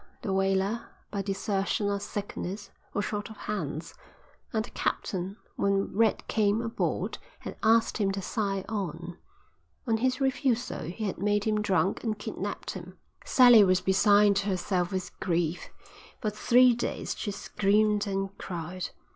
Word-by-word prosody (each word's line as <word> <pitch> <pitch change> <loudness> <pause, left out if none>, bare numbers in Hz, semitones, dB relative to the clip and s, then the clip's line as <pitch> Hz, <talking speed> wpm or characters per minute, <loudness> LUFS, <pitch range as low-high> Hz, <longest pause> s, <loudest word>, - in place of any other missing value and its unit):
The 195 - -1
whaler, 195 +3 +1 0.2
by 200 - -1
desertion 195 +1 -1
or 200 0 0
sickness, 205 -1 -5 0.2
was 205 - -1
short 210 +1 -3
of 220 - -11
hands, 160 -7 -4 0.6
and 220 -2 0
the - - -14
captain 190 +2 -2 0.2
when 200 -1 +1
Red 220 0 +2
came 210 -1 +2
aboard 230 -1 -2 0.2
had - - -6
asked 225 +1 +3
him 195 -2 +2
to 195 - -3
sign 195 -2 -1
on; 175 -4 -4 0.7
on 225 -3 +2
his 255 +3 +1
refusal 260 -2 0
he 180 +7 -5
had 195 -4 -2
made 205 +1 +1
him 215 -1 +1
drunk 190 -2 +1
and 220 -3 -1
kidnapped 210 - -4
him." - - -9 0.3
"Sally 245 -4 +8
was 185 -1 +4
beside 200 +2 +5
herself 185 -2 -1
with 185 -1 -3
grief. 175 -2 -1 0.5
For 215 -3 -1
three 245 +4 +5
days 235 - -3
she 210 - -4
screamed 210 +1 +1
and 195 0 -2
cried. 175 0 -5
200 Hz, 145 wpm, -28 LUFS, 190-215 Hz, 0.7 s, Sally